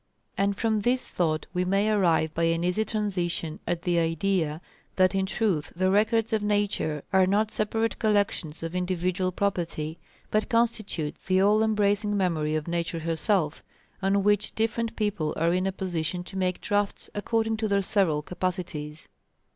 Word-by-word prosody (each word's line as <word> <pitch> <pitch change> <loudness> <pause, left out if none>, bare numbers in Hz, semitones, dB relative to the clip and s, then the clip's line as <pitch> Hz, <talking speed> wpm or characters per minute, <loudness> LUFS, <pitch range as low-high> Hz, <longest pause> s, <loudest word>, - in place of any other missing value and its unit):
And 200 0 +1
from 220 -2 +1
this 250 +4 +1
thought 155 -3 0
we 180 0 +1
may 195 +3 +2
arrive 170 -6 +2
by 165 - +1
an 165 0 +1
easy 180 +5 +1
transition 180 -7 -2
at 170 -1 -1
the 175 -1 +2
idea, 165 -1 0 0.4
that 185 0 +4
in 190 0 0
truth 190 -9 0
the 185 +1 +2
records 220 +2 +2
of 220 - +2
Nature 205 -8 0
are 190 -1 +5
not 210 +3 +2
separate 225 +1 0
collections 200 -8 0
of 165 +1 -4
individual 180 0 -1
property, 170 -5 -2 0.3
but 215 0 +1
constitute 220 -9 0
the 185 0 +3
all 205 +3 +4
embracing 210 -1 +2
memory 160 -5 0
of 155 0 -2
Nature 170 0 -2
herself, 165 0 0 0.4
on 195 +1 +2
which 205 0 +1
different 225 +1 -1
people 205 -8 -1
are 165 +2 +2
in 185 +1 +1
a - - 0
position 175 -2 -3
to 185 - -10
make 185 -1 -1
drafts 205 -1 -1
according 225 +1 0
to 220 0 -1
their 200 -1 +2
several 175 -7 +2
capacities. 175 -4 -4
190 Hz, 165 wpm, -27 LUFS, 170-210 Hz, 0.4 s, are